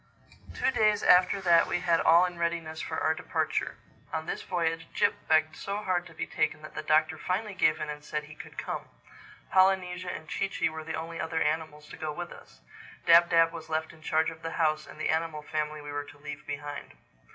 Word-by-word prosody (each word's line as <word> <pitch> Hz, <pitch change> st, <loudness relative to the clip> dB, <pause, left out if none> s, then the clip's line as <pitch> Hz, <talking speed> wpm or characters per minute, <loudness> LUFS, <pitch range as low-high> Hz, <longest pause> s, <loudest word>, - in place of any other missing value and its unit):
TWO -, -, +2 dB
days 215 Hz, -3 st, +3 dB
after 185 Hz, +2 st, +5 dB
that 170 Hz, -3 st, +5 dB
we -, -, 0 dB
had 170 Hz, -2 st, +3 dB
all 170 Hz, +2 st, +6 dB
in 175 Hz, -1 st, -5 dB
readiness 170 Hz, -2 st, -2 dB
for -, -, -3 dB
our -, -, +2 dB
departure. -, -, -2 dB, 0.3 s
On 160 Hz, 0 st, -3 dB
this -, -, -3 dB
voyage 165 Hz, -2 st, -1 dB
Jip -, -, +3 dB, 0.2 s
begged 155 Hz, 0 st, +3 dB
so 200 Hz, +4 st, -4 dB
hard 185 Hz, -4 st, -1 dB
to 165 Hz, -, -15 dB
be -, -, -3 dB
taken 155 Hz, -1 st, -1 dB
that 155 Hz, -, -10 dB
the -, -, -4 dB
Doctor 155 Hz, +1 st, +2 dB
finally 205 Hz, +3 st, -2 dB
gave 155 Hz, -4 st, +2 dB
in -, -, -3 dB
and 150 Hz, 0 st, -6 dB
said 150 Hz, 0 st, -3 dB
he 150 Hz, 0 st, -12 dB
could -, -, -12 dB
come. -, -, -4 dB, 0.7 s
Polynesia 185 Hz, -1 st, +3 dB
and 160 Hz, -, -7 dB
Chee 195 Hz, -, -1 dB
Chee -, -, 0 dB
were 160 Hz, 0 st, -7 dB
the 160 Hz, 0 st, -4 dB
only 165 Hz, +1 st, -5 dB
other 160 Hz, 0 st, -1 dB
animals 150 Hz, -1 st, -2 dB
to -, -, -9 dB
go 155 Hz, -1 st, -3 dB
with 175 Hz, +3 st, -6 dB
us. -, -, -14 dB, 0.4 s
Dab 170 Hz, +1 st, +7 dB
Dab 165 Hz, -1 st, +5 dB
was 160 Hz, -1 st, -8 dB
left 160 Hz, 0 st, -2 dB
in 160 Hz, -, -17 dB
charge 160 Hz, 0 st, +1 dB
of 160 Hz, 0 st, -12 dB
the 165 Hz, 0 st, -4 dB
house 155 Hz, -2 st, +1 dB
and -, -, -12 dB
the 155 Hz, -, -1 dB
animal 160 Hz, -1 st, -1 dB
family 150 Hz, 0 st, -3 dB
we 145 Hz, 0 st, -7 dB
were 145 Hz, 0 st, -3 dB
to 145 Hz, -, -14 dB
leave 145 Hz, 0 st, -8 dB
behind. 145 Hz, 0 st, -6 dB
160 Hz, 220 wpm, -29 LUFS, 155-175 Hz, 0.7 s, Dab